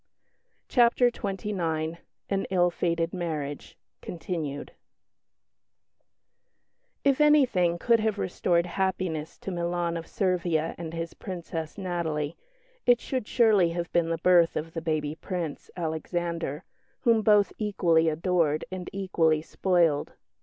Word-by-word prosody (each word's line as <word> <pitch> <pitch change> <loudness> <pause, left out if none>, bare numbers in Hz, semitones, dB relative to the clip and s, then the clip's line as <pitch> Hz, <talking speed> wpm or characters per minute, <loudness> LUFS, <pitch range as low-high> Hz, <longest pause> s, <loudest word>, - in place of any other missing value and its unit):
CHAPTER 245 0 +4
XXIX 175 -6 -3 0.3
AN 195 -1 -1
ILL 180 -2 +2
FATED 170 0 -1
MARRIAGE 155 -5 -4 0.2
continued 160 -4 -5 2.3
If 275 +1 +3
anything 245 - +4
could 230 +5 +3
have 215 -1 0
restored 175 -2 +1
happiness 180 -4 -2
to 195 - -6
Milan 175 -1 -1
of 165 - -7
Servia 175 -4 0
and 165 -1 -6
his 165 0 -4
Princess, 165 -3 -6
Natalie, 170 -5 -2 0.5
it 245 -1 +6
should 255 -4 -3
surely 215 -7 +4
have 170 0 -4
been 170 -1 +2
the 165 - 0
birth 170 0 +4
of 160 +1 -4
the 165 - -4
baby 155 -2 -1
Prince, 170 -2 -5
Alexander, 170 -1 -3 0.4
whom 230 -3 +4
both 210 -2 +4
equally 170 -6 +2
adored 160 -1 +1
and 185 -1 -5
equally 165 -5 +1
spoiled. 170 -5 +1
175 Hz, 120 wpm, -27 LUFS, 160-190 Hz, 2.3 s, it